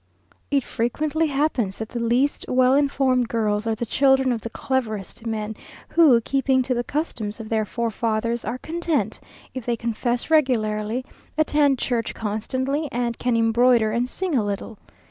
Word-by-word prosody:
It 280 -2 +2
frequently 300 +9 -1
happens 275 -9 0
that 220 - -5
the 240 - -4
least 240 +5 +1
well 255 0 +4
informed 270 -3 +2
girls 215 -1 0
are 225 - +1
the 235 - -3
children 265 +2 +3
of 230 -2 -2
the 230 - -5
cleverest 225 -4 -3
men, 220 -1 -3 0.3
who, 300 -8 +6
keeping 265 +1 +1
to 255 0 -1
the 240 0 -1
customs 235 -7 -3
of 220 -1 -7
their 220 -1 +1
forefathers, 230 +1 -1
are 235 +4 -3
content 330 +2 -2 0.3
if 260 - -5
they 240 +1 0
confess 240 +4 -2
regularly, 230 -5 +1 0.3
attend 295 -3 +3
church 235 -2 -2
constantly, 260 +8 -2
and 235 -1 -2
can 245 -1 +1
embroider 230 0 +4
and 240 +3 0
sing 365 -1 -2
a 235 - +3
little. 205 +1 -4
240 Hz, 160 wpm, -23 LUFS, 225-270 Hz, 0.3 s, who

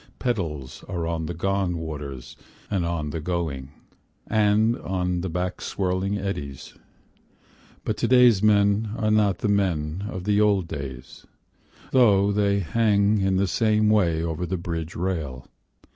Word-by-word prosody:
Petals 80 - -3
are 85 -2 -3
on 80 -1 -2
the 85 - -3
gone 95 0 0
waters 70 -4 -7 0.4
and 90 -4 0
on 80 -3 -2
the 80 - -4
going, 80 -6 -3 0.6
And 110 +1 +3
on 90 -4 -2
the 95 - -3
back 90 +2 -3
swirling 95 +1 -1
eddies, 75 -9 -5 1.1
But - - -1
to - - 0
day's 125 -5 +6
men 105 0 +3
are 110 -1 +1
not 105 -2 +3
the - - -2
men 95 -3 0
of 95 -3 -5
the 105 +1 +2
old 100 -4 +2
days, 65 -4 -8 0.6
Though 100 -6 +4
they 100 -1 +1
hang 105 +2 +2
in 95 0 +1
the 95 +1 +2
same 105 +2 +2
way 85 -7 +2
over 85 +1 -3
the 95 +2 -2
bridge 85 -1 -5
rail. 80 -8 -3
95 Hz, 145 wpm, -24 LUFS, 80-105 Hz, 1.1 s, day's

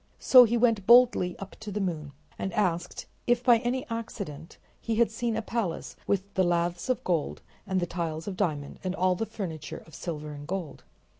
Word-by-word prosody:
So 255 -2 +8
he 235 +1 +1
went 225 -5 +2
boldly 235 -7 +6
up 195 0 -9
to 215 -1 -7
the 205 - -2
moon, 160 -7 -3 0.3
and 190 - -2
asked 175 -4 -1 0.2
if 240 0 +3
by 240 -3 +6
any 245 +2 -2
accident 200 - -6 0.2
he 230 - -2
had 235 0 +3
seen 230 0 -2
a 225 - -2
palace 210 -7 -3
with 200 0 -1
the 190 - +2
laths 175 +4 0
of 255 - 0
gold 170 -5 -1 0.2
and 190 -1 +1
the 175 - 0
tiles 165 -1 -4
of 200 - -3
diamond 150 -8 -2
and 185 0 -2
all 185 0 +2
the 220 +5 -3
furniture 160 -7 -6
of 160 - -18
silver 150 -3 -5
and 145 0 -9
gold. 185 -4 -5
190 Hz, 200 wpm, -28 LUFS, 170-225 Hz, 0.3 s, So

